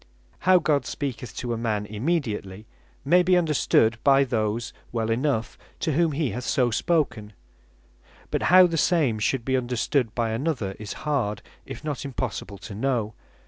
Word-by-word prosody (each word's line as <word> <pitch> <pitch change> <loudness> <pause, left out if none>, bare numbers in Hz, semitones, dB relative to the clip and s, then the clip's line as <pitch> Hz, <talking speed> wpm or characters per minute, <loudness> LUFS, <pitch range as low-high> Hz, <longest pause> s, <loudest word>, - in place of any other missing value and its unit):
How 185 - +8
God 145 -7 +1
speaketh 125 -3 -5
to 120 -2 -3
a 115 - -3
man 105 -3 -1
immediately, 105 - -3 0.4
may 180 +1 +5
be 180 +1 +3
understood 130 -8 +2
by 140 -1 +5
those 115 -2 -2 0.2
well 115 -1 -1
enough, 120 -1 -1 0.2
to 160 - 0
whom 165 +1 +2
he 140 -3 -1
hath 125 - -5
so 120 +2 +1
spoken; 115 -7 0 1.0
but - - 0
how 185 +1 +8
the 165 -2 -1
same 150 -10 +2
should 120 +3 0
be 130 - +1
understood 125 -1 0
by 115 -2 0
another, 115 -6 -2
is 105 -1 -6
hard, 130 -9 -1 0.2
if - - -8
not 150 -3 -3
impossible 125 -7 -4
to 105 - -9
know. 115 -1 -1
125 Hz, 160 wpm, -25 LUFS, 110-150 Hz, 1.0 s, How